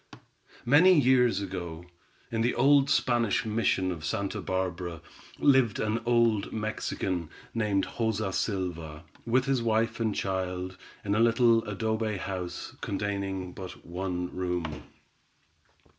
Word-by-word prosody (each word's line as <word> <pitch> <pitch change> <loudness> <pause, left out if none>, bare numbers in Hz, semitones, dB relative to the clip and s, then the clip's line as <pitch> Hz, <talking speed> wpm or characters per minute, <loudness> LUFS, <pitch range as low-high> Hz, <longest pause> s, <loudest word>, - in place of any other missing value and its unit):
Many 160 +7 +6
years 125 -4 +4
ago, 90 -3 -5 0.5
in 115 -1 0
the 120 +2 +1
old 140 +2 +5
Spanish 120 -2 +2
mission 105 -4 +1
of 85 -3 -6
Santa 100 +5 -2
Barbara, 90 -2 -3 0.4
lived 130 -6 +4
an 110 +2 0
old 115 -4 +3
Mexican, 95 -5 -3 0.2
named 105 -4 +1
Joza 110 -4 -2
Silva, 85 -7 -3 0.2
with 125 +2 +3
his 135 -3 +1
wife 115 0 +1
and 110 -3 0
child, 95 -1 -2 0.3
in 100 - +1
a 105 - +2
little 115 0 +4
adobe 110 +1 -1
house, 90 -1 -5
containing 100 -2 -3
but 95 -1 -9
one 90 0 -4
room. 90 -5 -3
100 Hz, 120 wpm, -28 LUFS, 90-115 Hz, 0.5 s, Many